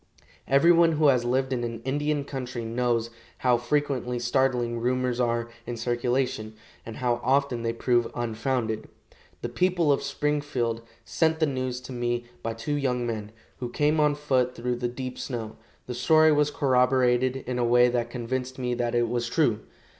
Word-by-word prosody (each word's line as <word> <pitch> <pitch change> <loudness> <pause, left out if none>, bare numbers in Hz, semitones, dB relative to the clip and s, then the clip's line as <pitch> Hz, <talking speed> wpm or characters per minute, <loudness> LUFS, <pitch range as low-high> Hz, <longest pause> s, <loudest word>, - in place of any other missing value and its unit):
Everyone 165 +4 +5
who 150 -1 +4
has 125 -3 +2
lived 130 +2 0
in 120 -1 -2
an 115 -1 -4
Indian 145 +1 -1
country 125 -4 -5
knows 115 0 0 0.3
how 125 -2 +3
frequently 125 -1 -1
startling 120 -1 +1
rumors 125 0 0
are 120 -1 0 0.2
in 120 - -4
circulation, 120 -2 -1 0.3
and 115 - -6
how 120 -1 0
often 135 -1 +1
they 115 0 0
prove 120 0 +1
unfounded. 115 -1 -2 0.6
The 120 - -2
people 175 +3 +2
of 140 - +2
Springfield 140 -5 -1 0.2
sent 160 -1 +1
the 160 - +4
news 130 -3 -2
to 125 - -10
me 120 0 -2 0.2
by 115 0 -3
two 115 +6 -3
young 125 -3 0
men, 110 -3 -4 0.3
who 125 - -4
came 150 +5 +1
on 150 -1 +3
foot 130 -4 0
through 120 +1 -2
the 120 0 -1
deep 125 +1 -6
snow. 115 -4 -5 0.3
The 125 - -5
story 155 +5 +5
was 150 -1 +3
corroborated 130 -2 +2
in 125 0 -2
a - - +2
way 120 +1 +5
that 120 -1 -1
convinced 125 +2 -4
me 125 -1 -1
that 120 -1 -1
it 120 0 +2
was 120 0 -2
true. 115 -7 +2
125 Hz, 170 wpm, -26 LUFS, 120-135 Hz, 0.6 s, Everyone